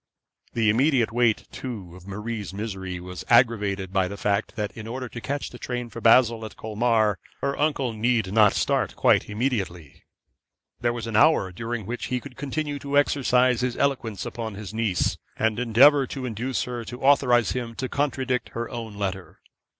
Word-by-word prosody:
The 110 -3 +3
immediate 125 -1 +2
weight, 120 -1 +2
too, 100 -9 -7
of 90 +1 -14
Marie's 105 -1 -5
misery 95 -4 -5
was 90 -1 -8
aggravated 105 -6 +3
by 95 -2 +2
the 100 +2 -7
fact 100 +1 -1
that 105 -2 -2
in 110 -1 -8
order 125 +2 -4
to 120 0 -8
catch 140 +3 -3
the 120 - -11
train 120 -1 -4
for 115 - -8
Basle 115 -1 +5
at 110 -3 -8
Colmar, 110 -1 +1 0.2
her 140 0 0
uncle 145 -5 0
need 110 -3 0
not 105 -2 +6
start - - 0
quite - - +3
immediately. 100 - -3 0.8
There 120 0 +1
was 120 -1 -5
an 115 -2 -4
hour 125 -7 +4
during 115 +3 -4
which 120 +4 -4
he 125 0 -1
could 125 0 -11
continue 145 +1 -3
to 140 +1 -1
exercise 125 -3 +3
his 125 -1 -1
eloquence 125 -8 -1
upon 110 -3 -5
his 105 0 -8
niece, 110 -5 0 0.2
and 110 0 +1
endeavour 130 +4 +5
to 130 0 -5
induce 125 +2 -2
her 120 -1 -5
to 125 +4 -8
authorise 125 -4 +4
him 120 -2 -4
to 130 - -3
contradict 130 -3 -1
her 120 0 -4
own 115 -4 -6
letter. 95 -2 -4
115 Hz, 180 wpm, -25 LUFS, 105-125 Hz, 0.8 s, not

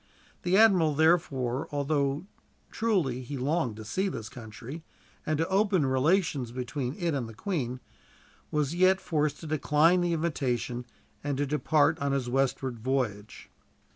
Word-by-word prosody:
The 180 +2 +2
admiral, 185 -9 +5
therefore, 140 -6 +2
although 145 +1 0 0.5
truly 180 - 0
he 135 +3 -6
longed 130 -3 0
to 110 0 -9
see 190 - -1
this 115 - -6
country, 125 +7 -9 0.4
and 155 0 +1
to 165 +2 0
open 190 -4 +2
relations 135 -1 +1
between 125 +2 -4
it 170 -4 -1
and 125 -5 -2
the 110 - -11
Queen, 130 - -3 0.7
was 150 0 0
yet 185 +2 +4
forced 150 -4 -1
to - - -8
decline 155 +3 +3
the 175 -1 +1
invitation, 125 -7 -1 0.4
and 145 -2 -2
so 145 - +1
to - - -2
depart 150 +1 +2
on 140 0 0
his 135 -3 -1
westward 130 -1 0
voyage. 110 -4 -3
145 Hz, 150 wpm, -28 LUFS, 125-165 Hz, 0.7 s, admiral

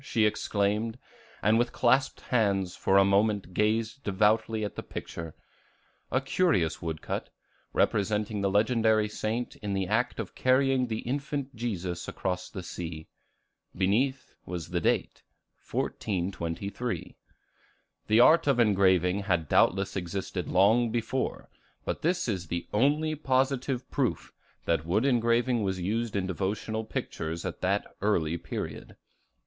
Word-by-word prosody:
she 115 -5 +2
exclaimed, 105 +2 0 0.5
and 110 +3 +4
with 120 0 +1
clasped 130 +2 +2
hands 100 -6 +1
for 95 - +2
a 100 - +6
moment 100 -1 +2
gazed 110 +5 0
devoutly 110 +2 +2
at 105 - -6
the - - -4
picture, 80 -2 -7 0.8
a 130 - +3
curious 135 - +1
wood 80 -2 -4
cut, - - -3 0.4
representing 105 +1 +1
the 100 - +2
legendary 110 +1 +3
saint 110 +3 -3
in 105 -2 -4
the 95 -1 0
act 110 +6 0
of 110 - -5
carrying 130 0 +2
the 110 -1 -3
infant 140 0 -3
Jesus 95 -7 -3
across 90 -1 -3
the 95 - -7
sea; 80 -2 -6 0.7
beneath, 125 +9 0
was 90 -3 -6
the - - -1
date, - - 0 0.5
1423. 95 +4 -3 0.9
The 110 +2 +4
art 155 +6 +6
of 135 -3 +3
engraving 95 -4 +3
had 90 -6 0
doubtless 95 +6 +3
existed 90 0 -3
long 110 +6 +4
before, 120 +3 -2 0.4
but - - -3
this 175 0 +1
is 95 -6 -2
the 85 +2 -3
only 150 +8 +2
positive 130 -2 0
proof - - -1 0.3
that 80 -3 +1
wood 100 +9 +1
engraving 120 -1 +2
was 95 -2 -1
used 110 +5 -1
in 100 -2 0
devotional 105 +4 -2
pictures 80 -5 -4
at 90 - -5
that 100 +2 +1 0.2
early 85 -6 +1
period. 85 - -6
105 Hz, 135 wpm, -28 LUFS, 95-120 Hz, 0.9 s, a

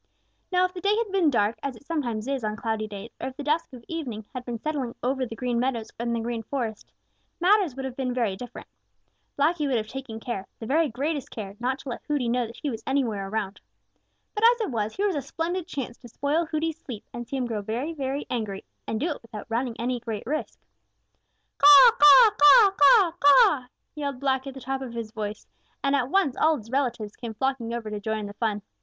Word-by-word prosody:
Now 365 0 +4
if 365 - -4
the 360 - -7
day 410 +3 +2
had 455 -3 -1
been 375 -5 +3
dark, 220 -4 +1
as 275 -3 -4
it 230 - -17
sometimes 245 -9 -2
is 275 -3 -2
on 215 0 -1
cloudy 220 -1 -2
days, 205 +2 -8
or - - -2
if 265 +1 -8
the 290 - -5
dusk 310 +3 0
of 245 -3 -12
evening 250 -10 -5
had 255 -2 -5
been 240 -1 -4
settling 270 -2 -3
over 260 0 0
the 225 - -7
Green 245 -1 -1
Meadows 240 -3 -1
and 235 0 -1
the - - -1
Green 230 0 -3
Forest, 225 -3 -4 0.5
matters 365 -5 +3
would 270 0 -5
have 260 -2 -5
been 255 -2 -2
very 235 -6 0
different. 245 +4 -9 0.7
Blacky 300 +1 +2
would 260 -3 +1
have 215 - -2
taken 230 -1 -7
care, 225 -5 -5
the 225 - -8
very 305 +5 +2
greatest 280 +4 -3
care, 200 -3 -7
not 255 +2 -1
to 275 - -9
let 240 - -5
Hooty 290 -5 0
know 245 0 +1
that 230 - -11
he 290 - 0
was 225 -1 -6
anywhere 230 -8 0
around. 205 -1 -3 0.7
But 425 - -3
as 475 +1 +6
it 430 - -2
was, 215 -2 -2
here 405 - 0
was 395 -4 +1
a 290 - -1
splendid 335 +6 -3
chance 265 -8 -5
to 245 - -12
spoil 300 +7 0
Hooty's 320 0 -2
sleep 240 -10 -8
and 240 -1 -6
to - - -29
see 275 - -2
him 255 - -1
grow 225 -3 -3
very, 240 +10 -3
very 275 -1 -3
angry 215 -5 -4 0.2
and 220 - -2
do 310 - 0
it - - -6
without 220 -2 -9
running 235 +1 -1
any 245 +1 -1
great 225 -3 -5
risk. 305 +5 -3 1.0
"Caw, 390 +5 +10
caw, 405 +4 +9
caw, 395 +1 +8
caw, 390 -1 +6
caw!" 280 -2 +6 0.3
yelled 280 -4 -4
Blacky 265 0 0
at 270 - -7
the 265 - -9
top 265 +2 -3
of 255 -3 -6
his 225 -2 -5
voice, 215 -2 -5 0.4
and 275 0 +2
at 255 -2 0
once 340 -7 +2
all 315 -1 +3
his 225 -1 -12
relatives 240 -6 -1
came 230 -3 -7
flocking 260 -1 -1
over 230 -2 -4
to 210 - -3
join 220 +1 -2
in - - -5
the 205 - -7
fun. 210 -2 -2
255 Hz, 235 wpm, -26 LUFS, 225-300 Hz, 1.0 s, Caw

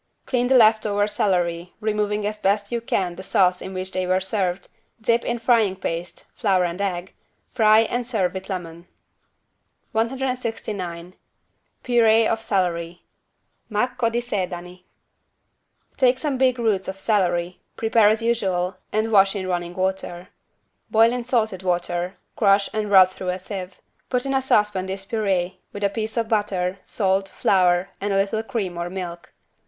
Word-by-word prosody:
Clean 245 -1 +1
the 260 0 +5
left 220 -2 +5
over 205 0 +1
celery 175 -4 -1
removing 210 -1 -1
as 210 0 -3
best 200 +1 0
you 235 -1 -1
can 185 -6 -1
the 185 - -8
sauce 185 -1 +2
in 190 - -6
which 185 0 -4
they 185 -1 -2
were 185 +1 +2
served, 190 -1 -2 0.3
dip 230 +1 +1
in 240 - -1
frying 225 -5 +2
paste 175 -2 -5
(flour 190 -5 +2
and 175 +3 -4
egg) 185 -2 -3 0.4
fry 220 -2 +5
and 240 +2 -2
serve 195 -8 0
with 190 +1 -7
lemon. 170 -2 -6 1.0
169 225 -8 -3 0.7
PURÉE 225 -2 +4
OF 225 0 -1
CELERY 175 -5 -1 0.7
(Macco 230 +2 0
di 235 +1 -1
sedani) 180 -5 -5 1.1
Take 255 -2 +4
some 275 -2 -2
big 255 -1 +3
roots 215 -5 0
of 190 0 -5
celery, 180 -4 0 0.2
prepare 225 -1 +4
as 220 +2 +1
usual 190 -6 0
and 215 +1 0
wash 195 -1 +5
in 190 -2 -3
running 175 -1 -3
water. 185 -1 -3 0.6
Boil 225 +2 +5
in 245 -1 -2
salted 220 -6 0
water, 175 0 -2 0.2
crush 200 -2 +3
and 215 -1 -2
rub 190 -2 +7
through 185 0 -5
a 180 - -1
sieve. 185 -1 -7 0.3
Put 250 0 0
in 275 - -1
a 265 - +2
saucepan 210 -7 +1
this 195 0 -5
purée, 190 -4 -1
with 205 - -6
a 200 - +3
piece 220 +2 -4
of 230 -1 +1
butter, 195 -4 -1
salt, 195 -1 0
flour 180 -1 +2
and 205 +1 -1
a 195 - +2
little 200 +3 +1
cream 195 -6 -4
or 175 0 -3
milk. 175 -3 -7
195 Hz, 160 wpm, -23 LUFS, 180-225 Hz, 1.1 s, rub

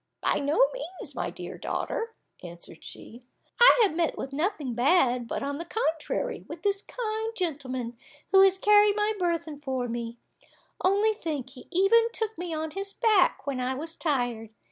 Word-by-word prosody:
"By - - +1
no 300 - +3
means, 380 -7 -7
my - - -2
dear - - -8
daughter," 455 -1 -3 0.3
answered 170 -1 -10
she, 235 +2 -10 0.4
"I - - +8
have 385 -7 +1
met 335 -1 0
with 270 - -5
nothing 305 - -1
bad, 250 -2 +3
but, - - -3
on 285 +1 -3
the - - -3
contrary, 355 +4 -2
with 320 0 -8
this 400 -1 +1
kind 445 -1 -4
gentleman, 260 -8 -3 0.4
who 385 - +7
has 385 -1 +5
carried 415 +1 +5
my 425 0 +1
burthen 335 -4 -1
for 260 -4 -2
me; 235 0 -5 0.7
only 405 +4 +3
think, 295 - -4
he 255 -2 -13
even 390 +6 +4
took 445 -1 -1
me 350 0 -5
on 315 0 -3
his 395 +4 -5
back 430 -6 +3
when 275 -2 -2
I 255 +1 -1
was 320 +4 -6
tired. 245 -9 -1
330 Hz, 170 wpm, -27 LUFS, 265-410 Hz, 0.7 s, I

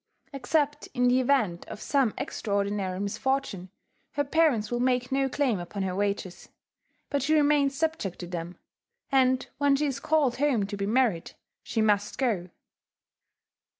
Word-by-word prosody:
Except 290 +2 0
in 250 0 +3
the 250 +1 +4
event 245 -10 +1
of - - -8
some 265 -1 +1
extraordinary 200 -3 -2
misfortune, 200 -2 -2 0.4
her 290 - +1
parents 280 -8 +2
will 240 - 0
make 250 0 +1
no 270 0 +1
claim 255 -7 0
upon 185 +3 -5
her 185 -1 -2
wages; 200 -2 -3 0.6
but 285 - +1
she 305 +4 +2
remains 290 -2 +3
subject 315 - -1
to 180 - -6
them; 175 0 -6 0.5
and 260 -1 +3
when 285 -1 +4
she 295 +2 0
is 275 -2 -2
called 290 -6 +1
home 265 -7 +2
to 205 - -5
be 200 0 -2
married, 220 -7 +1 0.3
she 225 - -1
must 205 -1 +1
go. 210 -9 0
245 Hz, 150 wpm, -27 LUFS, 200-275 Hz, 0.6 s, the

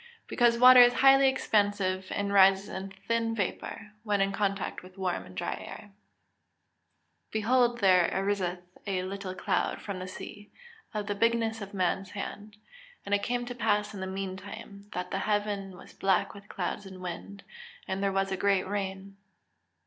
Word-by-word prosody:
_ - - -21 0.2
Because 240 -1 +3
water 255 +1 +9
is 245 0 +8
highly 270 0 +6
expansive, 205 -6 0
and 200 0 -2
rises 195 0 +5
in 190 +1 -5 0.2
thin 230 -1 0
vapour, 205 +1 -4
when 210 -2 0
in 195 0 +2
contact 195 -1 -2
with 185 +1 -15
warm 185 -2 -2
and 95 - -13
dry - - -2
air. - - -9
[Verse: 205 +2 -44
"Behold 240 +2 +2
there 185 -3 +5
ariseth 190 -2 -1 0.2
a 185 -2 -1
little 190 0 -5
cloud - - -1
from 200 -3 -6
the 185 - -6
sea, 205 +2 -9 0.4
of 210 -1 -3
the 205 - -1
bigness 225 +1 +1
of 200 0 -8
a - - -5
man's 190 +1 0
hand. 205 +1 -7 0.5
And 200 - -2
it 205 - +3
came 245 +3 -1
to 245 - -5
pass 210 -3 0
in 200 - -7
the 190 - -4
meantime, 195 +2 -7
that 180 0 -4
the - - -1
heaven 205 -3 -1
was - - -14
black 195 -1 +1
with 200 0 -14
clouds 195 +1 -4
and 190 -1 -10
wind, 185 +3 -7 0.4
and 190 +1 -2
there 200 0 +1
was 195 0 0
a 190 - -1
great 195 -1 +2
rain." 195 0 -4
200 Hz, 180 wpm, -29 LUFS, 190-215 Hz, 0.5 s, water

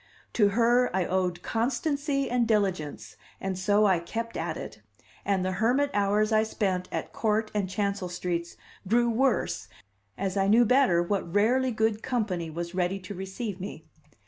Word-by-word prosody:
To 210 -3 +4
her 240 +1 +4
I 190 -2 +1
owed 180 -1 -1
constancy 275 +4 -1
and 245 -1 +1
diligence, 190 -9 -1 0.2
and 190 -1 -3
so 205 +3 +3
I 190 -4 +4
kept 230 +7 -5
at - - -3
it; - - -8 0.4
and 195 -2 +1
the 185 - 0
hermit 245 +9 +1
hours 205 +2 +2
I 215 0 +4
spent 190 -4 -1
at - - -4
Court 215 0 0
and 200 -3 -1
Chancel 200 -2 -2
streets 170 -1 -3 0.3
grew 235 +3 +3
worse 255 +2 0 0.5
as 195 0 -2
I 195 0 +2
knew 230 +4 +5
better 240 -8 +4
what 180 -2 -2
rarely 245 +7 +3
good 220 -2 0
company 200 -9 -2
was 170 +2 -5
ready 180 +1 0
to 190 +1 -8
receive 190 +2 -5
me. 170 -4 -7
205 Hz, 165 wpm, -27 LUFS, 185-230 Hz, 0.5 s, knew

